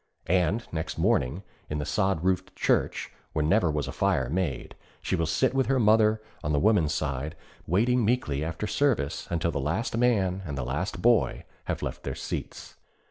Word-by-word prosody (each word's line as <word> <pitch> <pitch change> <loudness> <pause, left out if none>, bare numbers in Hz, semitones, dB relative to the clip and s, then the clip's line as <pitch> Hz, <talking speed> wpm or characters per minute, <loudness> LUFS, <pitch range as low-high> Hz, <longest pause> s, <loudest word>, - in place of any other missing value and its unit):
And 90 +6 +1
next 80 -1 -4
morning, 70 +10 +1 0.3
in 75 - -2
the 75 - -2
sod 95 -1 0
roofed 95 0 0
church - - 0 0.2
where 75 -1 0
never 90 +1 +3
was 75 -1 -1
a - - -4
fire 65 -2 +1
made, 85 -7 -2 0.3
she - - -1
will 85 -2 0
sit 130 +11 +2
with 135 -1 +1
her 135 -1 +2
mother 110 -1 +4 0.2
on 75 - 0
the 70 - +3
women's 90 -6 +3
side, 75 0 -2 0.3
waiting 120 +8 +2
meekly 100 - 0
after 80 +6 -3
service 105 - 0
until 85 0 0
the - - -2
last 85 - -1
man 100 -6 +2
and 70 -6 -5
the 65 - -2
last 75 +10 -3
boy 120 -1 +3 0.2
have - - -3
left - - -4
their - - -4
seats. - - -6
90 Hz, 185 wpm, -27 LUFS, 75-110 Hz, 0.3 s, mother